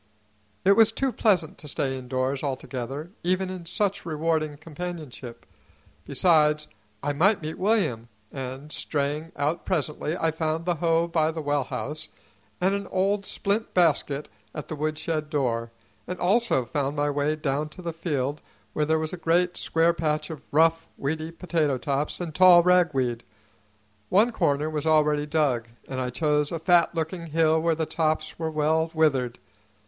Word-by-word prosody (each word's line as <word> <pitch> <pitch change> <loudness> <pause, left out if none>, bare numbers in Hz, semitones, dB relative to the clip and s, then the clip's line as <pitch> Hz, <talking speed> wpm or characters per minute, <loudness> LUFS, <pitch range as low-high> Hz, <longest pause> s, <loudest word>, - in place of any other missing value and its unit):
It 195 - +6
was 225 +2 +6
too 270 +3 0
pleasant 185 -10 +1
to 150 - -10
stay 135 -1 -1
indoors 130 +1 -2
altogether, 135 +2 -4
even 185 +1 0
in 180 -3 -7
such 200 +1 -1
rewarding 155 -2 -1
companionship; 155 -6 -8 0.6
besides, 150 -3 +3 0.4
I 145 0 0
might 185 +5 +3
meet 155 +1 -5
William; 180 - +1 0.2
and, 135 +2 -6
straying 150 +3 -2
out 150 +4 -1
presently, 155 -1 -2
I 165 -2 +1
found 160 +1 -2
the 180 - +2
hoe 165 0 +1
by 160 -2 +1
the 160 -1 -4
well 145 -2 0
house 150 +3 -5 0.5
and 190 +2 +2
an 200 -1 -3
old 195 +2 0
splint 210 +3 -2
basket 150 -4 +2 0.3
at - - -6
the 155 - -3
woodshed 155 +1 -2
door, 120 -6 -1 0.4
and 180 - -4
also 195 - +2
found 140 +4 -2
my 145 0 +1
way 145 +2 0
down 150 0 -2
to 180 +4 -12
the 170 -1 -3
field 150 -4 -2 0.3
where 150 - +1
there 160 +1 +2
was 155 +1 -3
a - - -4
great 175 +2 +1
square 165 +1 +2
patch 155 -1 -1
of 155 - -7
rough, 165 +2 +3
weedy 155 +3 -2
potato 165 -5 0
tops 140 +3 -2
and 170 -3 -4
tall 180 0 +7
ragweed. 140 -10 +2 0.9
One 215 +6 +4
corner 145 -8 +1
was 155 0 -3
already 150 -1 +3
dug, 145 -7 +1 0.2
and 130 -1 -3
I 125 - -2
chose 150 +2 +1
a 170 - -2
fat 170 +1 +3
looking 165 +1 -3
hill 160 0 +2
where 165 0 +2
the 160 0 -1
tops 155 0 -1
were 160 -1 -1
well 160 +1 +1
withered. 135 -6 +2
155 Hz, 165 wpm, -26 LUFS, 145-170 Hz, 0.9 s, tall